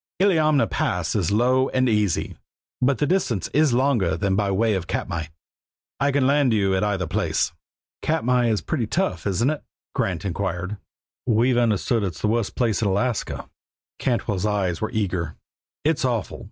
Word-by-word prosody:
Illiamna 155 -7 +4
Pass 90 -3 -1
is 95 -6 +1
low 125 +5 +3
and 130 0 +1
easy, 105 -6 0 0.5
but 130 +1 +3
the 150 - +1
distance 145 - 0
is 155 -2 +4
longer 120 - +2
than 95 +2 0
by 100 0 +1
way 110 +3 +2
of 95 -3 -2
Katmai. 80 -2 -2 0.7
I 140 +1 +2
can 140 -1 +2
land 140 -3 +3
you 100 -3 +2
at 95 - +1
either 100 -3 0
place." 80 - 0 0.5
"Katmai 125 -6 +1
is 110 -3 +1
pretty 125 -8 -2
tough, 95 -6 -1
isn't 115 +8 +2
it?" 155 - -5 0.3
Grant 90 -1 -1
inquired. 95 +1 -3 0.5
"We've 120 +2 +3
understood 115 0 +2
it's 95 -5 -3
the - - +1
worst 115 -2 0
pass 115 -4 +1
in 105 - +1
Alaska." 105 +4 -1 0.5
Cantwell's 105 -6 0
eyes 95 -5 -1
were 110 - -1
eager. 90 -7 -2 0.5
"It's 155 -1 +2
awful! 120 -5 -1
110 Hz, 165 wpm, -23 LUFS, 95-130 Hz, 0.7 s, Illiamna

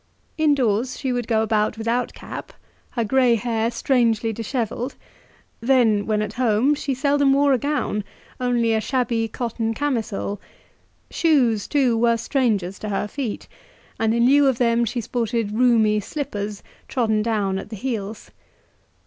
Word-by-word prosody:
Indoors 260 -6 +1
she 260 -2 -2
would 245 -2 -2
go 220 -2 +2
about 215 0 0
without 230 +2 -1
cap, - - -8 0.4
her 235 - -2
grey 250 +1 +3
hair 230 0 -1
strangely 230 -2 +1
dishevelled; 235 +3 -3 0.6
then, 230 -4 +3
when 215 -1 +1
at 210 0 -5
home, 240 +4 +3
she 285 -2 -2
seldom 280 0 +3
wore 280 0 +4
a 255 - +2
gown 285 -7 -1 0.4
only 240 -2 +1
a 220 - +1
shabby 235 -3 0
cotton 225 0 -3
camisole; 220 -7 -2 0.7
shoes, 250 -10 +2
too, 265 -5 +2
were 230 0 +3
strangers 215 -7 0
to 215 - -5
her 205 +1 -1
feet, 245 -2 -5 0.5
and 225 0 +2
in 235 0 +3
lieu 280 +2 +5
of 260 -3 +2
them 235 -1 +2
she 240 +2 -2
sported 230 -2 -2
roomy 220 -2 +3
slippers, 205 -4 -5 0.2
trodden 220 -4 +1
down 205 -4 0
at - - -9
the 220 - -6
heels. 215 -2 -5
230 Hz, 150 wpm, -22 LUFS, 215-255 Hz, 0.7 s, lieu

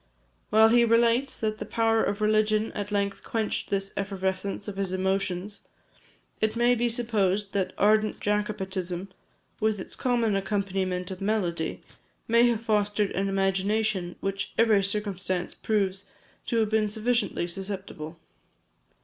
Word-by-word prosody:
While 220 +1 +6
he 240 +1 +5
relates 235 +3 +3
that 215 -1 -1
the - - -3
power 225 +1 +2
of 205 +1 -1
religion 215 0 +2
at 205 0 -5
length 200 -1 -1
quenched 220 -2 -2
this 195 0 -1
effervescence 195 0 -2
of 200 -2 -6
his 195 -2 -1
emotions, 190 +1 -2 0.7
it 220 +1 +1
may 240 +1 +4
be 240 0 +1
supposed 210 -4 0
that 185 -2 -1
ardent 215 +1 +3
Jacobitism, 195 -3 -2 0.5
with 215 -1 +1
its - - -8
common 235 -4 +1
accompaniment 195 -2 -1
of 185 - -7
melody, 185 -6 -1 0.5
may 235 +1 +5
have 230 -2 0
fostered 210 -2 +1
an 195 +1 -1
imagination 195 0 0
which 195 0 -3
every 220 -3 +4
circumstance 195 -3 -2
proves 200 -2 -1 0.4
to 230 - 0
have 215 - +1
been 215 -1 +2
sufficiently 225 -3 0
susceptible. 185 -4 -5
205 Hz, 135 wpm, -27 LUFS, 195-220 Hz, 0.7 s, While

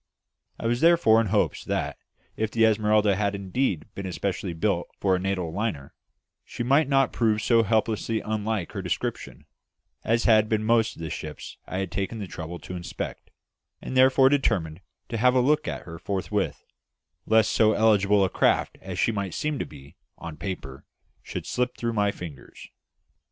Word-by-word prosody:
I - - -6
was 120 +1 0
therefore 165 -10 +5
in 115 - -1
hopes 105 +1 0
that, - - -2 0.4
if 110 -1 -1
the 115 0 +3
Esmeralda 105 -2 +3
had 100 0 0
indeed 100 - -1
been 100 -1 -5
especially 95 0 -3
built 85 0 0
for 95 -2 +2
a - - -1
Natal 90 -3 -2
liner, 95 -9 -3 0.5
she - - -5
might 140 +4 +3
not 135 -1 +3
prove 110 -3 +2
so 115 +1 +3
hopelessly 110 0 0
unlike 110 -3 -2
her - - -4
description - - -4 0.6
as 115 +1 +1
had 110 -1 +4
been 110 -1 +1
most 115 0 +2
of 85 - -9
the 80 - -4
ships 75 -1 -7
I 90 - -4
had 95 -2 -3
taken 100 +5 -3
the 105 - -4
trouble 85 -1 -7
to 90 - -7
inspect; 85 -1 -6 0.5
and - - -7
I 130 0 +4
therefore 130 0 +6
determined 90 - 0 0.3
to 115 - -2
have 125 +3 +3
a - - +5
look 150 +4 +2
at - - -4
her 85 -1 -9
forthwith, 100 +1 -2 0.6
lest 110 0 +4
so 110 -1 +4
eligible 105 -2 +4
a - - -1
craft - - +1
as - - -6
she 115 - +2 0.2
seemed 150 - -2
to - - -3
be 70 +4 -14 0.2
on 85 -2 -8
paper 75 -6 -6 0.4
should - - -6
slip 125 0 -2
through 115 -1 -2
my 105 -2 +2
fingers. 85 -8 -10
105 Hz, 180 wpm, -26 LUFS, 95-115 Hz, 0.6 s, therefore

